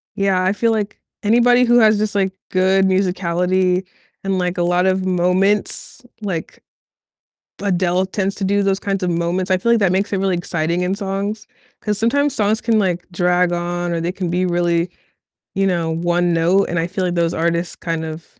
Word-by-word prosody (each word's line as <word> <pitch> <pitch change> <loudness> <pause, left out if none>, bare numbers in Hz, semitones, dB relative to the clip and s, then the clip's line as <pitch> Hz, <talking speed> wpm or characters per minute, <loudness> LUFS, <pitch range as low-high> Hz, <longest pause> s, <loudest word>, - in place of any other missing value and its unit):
Yeah, 195 -2 +1
I 185 +2 +2
feel 230 +2 +1
like 210 -2 -2 0.2
anybody 240 +3 +4
who 240 0 +5
has 215 -2 +5
just, 210 0 -2
like, 190 -1 +1 0.2
good 190 +1 +3
musicality 185 0 +1 0.4
and, 195 -1 -1
like, 180 0 -1
a 175 - +1
lot 175 +1 +2
of 190 0 +1
moments, 185 +7 0 0.2
like 180 -6 -5 1.0
Adele 185 -1 +1
tends 195 0 -2
to 200 - -3
do 200 +1 +2
those 195 0 +1
kinds 195 -1 -2
of 180 - 0
moments. 170 +3 -1
I 185 - +3
feel, 235 +5 +1
like, 235 - +4
that 190 -3 +2
makes 195 +2 0
it 195 - +1
really 190 -1 0
exciting 170 0 -2
in 180 +2 0
songs, 200 +2 -4 0.3
'cause 210 -1 -2
sometimes 285 +5 +1
songs 215 0 +1
can, 225 -2 +1
like, 180 -2 -1
drag 180 0 +2
on 175 0 -2
or 170 - -1
they 170 +2 -1
can 185 -2 -4
be 180 +1 0
really, 175 0 0 0.6
you 195 0 +1
know, 170 -3 0
1 175 +1 0
note, 175 +4 +3
and 170 - -1
I 165 - 0
feel, 185 +1 -3
like, 175 -1 -1
those 170 -1 +1
artists 170 0 -1
kind 165 -1 -3
of 160 +1 -7
185 Hz, 195 wpm, -19 LUFS, 175-200 Hz, 1.0 s, who